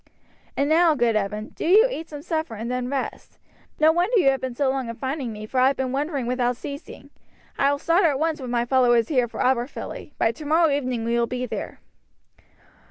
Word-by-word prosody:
"And 280 - +2
now, 320 +1 +4
good 235 -4 +1
Evan, 210 +1 -2
do - - -8
you 415 +8 +6
eat 325 -8 -6
some 295 -1 -8
supper, 315 -7 -3
and 225 +3 -5
then 250 0 -2
rest. 275 -1 -5 0.4
No 310 +1 +6
wonder 360 +8 +1
you 275 -9 +5
have 270 -1 -3
been 260 -2 -4
so 280 +2 +1
long 260 -2 -1
in 230 - -5
finding 265 -1 -3
me, 215 0 -7
for 255 +4 -2
I 255 - +5
have 275 - +2
been 260 -1 -2
wandering 280 -1 -2
without 245 0 0
ceasing. 280 +1 -9 0.5
I 275 +1 +4
will 285 - 0
start 335 +6 +2
at 290 -4 +2
once 315 0 -1
with 255 - -6
my 240 0 0
followers 240 -3 +3
here 255 -5 +2
for - - -6
Aberfilly; 255 +3 -2
by 225 - +2
tomorrow 310 +5 +2
evening 255 -5 -1
we 235 +1 +1
will 235 - +1
be 250 +1 -3
there." 245 - -6
265 Hz, 220 wpm, -24 LUFS, 240-300 Hz, 0.5 s, you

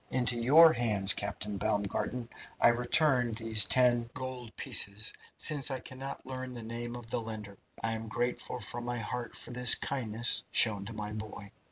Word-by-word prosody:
Into 125 -1 +2
your 150 +8 +6
hands, 105 -5 +4
Captain 100 0 -5
Baumgarten, 105 +5 -2 0.3
I - - +5
return 125 0 +2
these 110 -1 +5
ten 120 -2 +3
gold 130 -3 -7
pieces, 100 +2 +1 0.2
since 145 -2 +2
I 130 -1 -4
cannot 130 +2 -9
learn 130 -1 -7
the 120 - -8
name 120 +1 -6
of 120 -1 -9
the 120 - -2
lender. 105 -3 -8 0.2
I 115 - -1
am 110 0 -5
grateful 120 +2 -3
from 120 +2 -5
my 120 0 -4
heart 120 +1 -6
for - - -7
this 125 -1 +5
kindness 120 -3 0
shown 105 -4 +3
to 115 - -7
my 105 -1 -6
boy. 105 -2 -9
120 Hz, 170 wpm, -30 LUFS, 110-125 Hz, 0.3 s, your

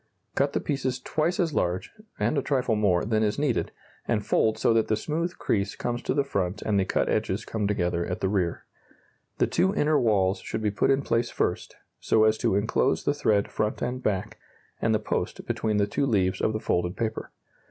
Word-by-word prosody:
Cut 140 +1 +1
the - - +1
pieces 130 -3 -2
twice 160 +7 -1
as 165 -4 +1
large 90 -3 -1 0.3
(and - - +1
a 140 - +2
trifle 130 -5 0
more) 100 -4 +2
than 110 0 +1
is 105 -1 +1
needed, 140 -5 0 0.4
and 105 -3 0
fold 110 0 +2
so - - +3
that 115 -1 +2
the 110 - +2
smooth 165 +9 -3
crease 100 -2 -1
comes 120 0 -3
to - - -1
the 140 - +3
front 100 -6 -2
and 105 -2 +1
the 95 - +1
cut - - 0
edges - - -1
come 105 -2 -2
together 90 -4 0
at 90 - -3
the - - 0
rear. 95 -4 -1 0.7
The - - +3
two 190 +2 +1
inner 150 -4 +3
walls 100 -4 +2
should - - -5
be 105 - +1
put 100 - +1
in 135 +1 +3
place 115 -1 0
first, - - -2 0.2
so 110 - +3
as 110 0 +3
to - - +1
enclose 110 +5 +1
the 145 - +2
thread 105 -8 +1
front 105 0 -1
and 125 +1 -2
back, 95 -6 -2 0.4
and - - +2
the - - +4
post, - - -3
between 110 -1 -1
the 100 - +3
two 120 +7 -1
leaves 95 -5 +1
of 110 - +1
the 110 - -1
folded 90 -4 -1
paper. 115 -2 -3
110 Hz, 215 wpm, -26 LUFS, 100-135 Hz, 0.7 s, the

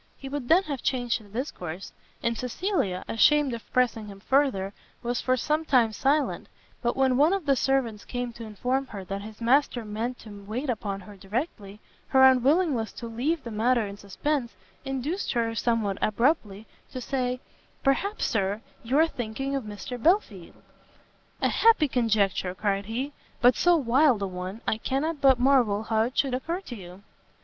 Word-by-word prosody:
He 270 - -8
would 280 -3 -4
then 350 +7 +5
have 280 -7 -4
changed 245 -3 0
the 205 - -17
discourse, 195 - -5 0.3
and 235 0 +1
Cecilia, 250 - -1
ashamed 290 +3 +4
of 230 - -8
pressing 235 -4 +1
him 200 -1 -10
further, 215 -6 +1 0.3
was 240 +1 -1
for 255 0 +1
some 305 +5 0
time 250 -7 +3
silent; 280 +5 0 0.3
but 240 +1 -1
when 260 -2 +3
one 305 +6 +5
of 390 -5 -2
the 275 -2 +4
servants 250 -6 0
came 245 -1 -4
to 230 - -9
inform 250 +5 -2
her 200 -5 -8
that 195 +1 -4
his 215 +1 -10
master 245 0 +2
meant 225 +4 -3
to 205 -2 -11
wait 245 +7 -2
upon 200 -3 -4
her 205 +1 -12
directly, 205 - -5 0.3
her 265 -1 +5
unwillingness 265 -1 +4
to 235 - -8
leave 265 +7 -1
the 235 - -6
matter 230 +2 +2
in 200 0 -7
suspense 235 +4 -3 0.3
induced 270 +8 -2
her, 230 -2 0
somewhat 225 -4 0
abruptly, 215 -3 +1 0.2
to 255 - -6
say, 250 -1 -2 0.4
"Perhaps, 395 +10 +1
Sir, 200 0 0 0.2
you 250 +4 0
are 320 +1 +5
thinking 255 +1 -4
of 270 -4 -3
Mr 210 +4 -7
Belfield?" 270 - 0 0.8
"A - - +4
happy 445 -9 +4
conjecture!" 210 -7 +1
cried 200 0 -1
he, 260 +6 -3 0.3
"but 245 +1 +5
so 350 0 +4
wild 260 -5 +3
a - - 0
one, 185 +4 -6
I 220 - 0
cannot 285 +5 -2
but 265 -3 +6
marvel 245 -6 +3
how 220 0 +1
it 240 +3 -2
should 270 -3 +2
occur 330 +8 -2
to 250 - -8
you!" 185 -1 -11
245 Hz, 175 wpm, -27 LUFS, 210-275 Hz, 0.8 s, but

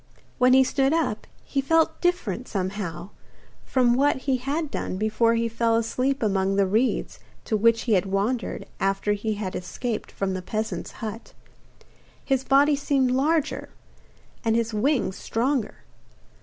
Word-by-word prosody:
When 250 0 +5
he 265 0 +7
stood 270 +2 +1
up, 320 -10 -1 0.2
he 275 - -1
felt 320 +3 +2
different, 255 - -1
somehow, 190 -2 -4 0.5
from 250 -2 +2
what 280 +4 +3
he 265 -2 +2
had 285 +4 -3
done 185 - -3
before 220 +3 +2
he 230 0 +1
fell 230 0 +1
asleep 255 +4 0
among 195 -2 +1
the 200 0 +3
reeds 220 +7 0 0.3
to 220 - 0
which 230 +2 +3
he 230 - +1
had 195 0 +2
wandered 205 +5 -1
after 195 +1 +1
he 210 +1 -2
had 200 -3 -4
escaped 215 +5 -4
from 195 -1 -2
the 185 - -3
peasant's 215 +4 -4
hut. 220 +2 -7 0.9
His 265 -2 +1
body 285 +2 +4
seemed 275 -2 +1
larger, 300 +3 0 0.7
and 225 -2 +2
his 230 -1 0
wings 225 -3 +1
stronger. 245 0 -2
230 Hz, 150 wpm, -25 LUFS, 205-270 Hz, 0.9 s, he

